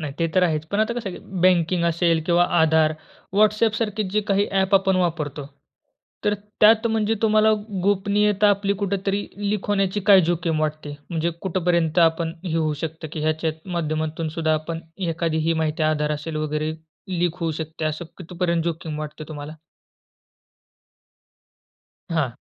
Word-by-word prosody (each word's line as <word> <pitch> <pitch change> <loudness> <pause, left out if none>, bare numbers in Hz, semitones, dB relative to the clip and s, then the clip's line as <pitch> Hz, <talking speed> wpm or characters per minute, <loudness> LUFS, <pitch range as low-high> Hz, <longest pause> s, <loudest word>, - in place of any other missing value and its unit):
नाही 150 -3 -4
ते 165 - +2
तर 185 - +4
आहेच. 155 -3 0
पण 200 +6 -1
आता 225 +2 +1
कसं 240 -4 -4
आहे - - -8
की - - -17 0.2
बँकिंग 175 -1 +3
असेल 170 -1 +2
किंवा 175 0 +4 0.2
आधार, 160 -1 +4 0.4
WhatsAppसारखे 215 0 +2
जे 215 +2 +1
काही 200 +1 +2
ॲप 195 0 +2
आपण 195 -1 +3
वापरतो, 155 -5 -1 0.8
तर 205 - +2 0.3
त्यात 220 +2 +6
म्हणजे 220 -1 +1
तुम्हाला 215 0 +4 0.3
गोपनीयता 205 +1 +2
आपली 200 0 +1
कुठेतरी 200 +1 -1 0.2
लीक 210 -2 -2
होण्याची 200 0 +1
काय 195 -2 +8
जोखीम 170 -2 0
वाटते? 155 -1 -3 0.2
म्हणजे 170 0 0
कुठपर्यंत 175 -3 0
आपण 165 -1 +3
हे 170 -3 -2
होऊ 155 -2 +1
शकतं 160 0 -5
की 155 - -4
ह्याच्या 155 +1 0 0.2
माध्यमातून 160 -1 -2
सुद्धा 160 0 0
आपण 165 +1 -4 0.3
एखादी 165 -1 -1
ही - - +4
माहिती 155 0 -1
आधार 150 -1 +1
असेल 155 +1 -4
वगैरे 155 0 -2 0.5
लीक 175 0 0
होऊ 165 -1 0
शकते, 160 +1 -5
असं 155 +2 -2
कितीपर्यंत 170 -1 -1
जोखीम 160 -2 -3
वाटतं 150 0 -7
तुम्हाला? 150 0 -7 2.6
हां. 155 -7 0
170 Hz, 150 wpm, -23 LUFS, 155-195 Hz, 2.6 s, काय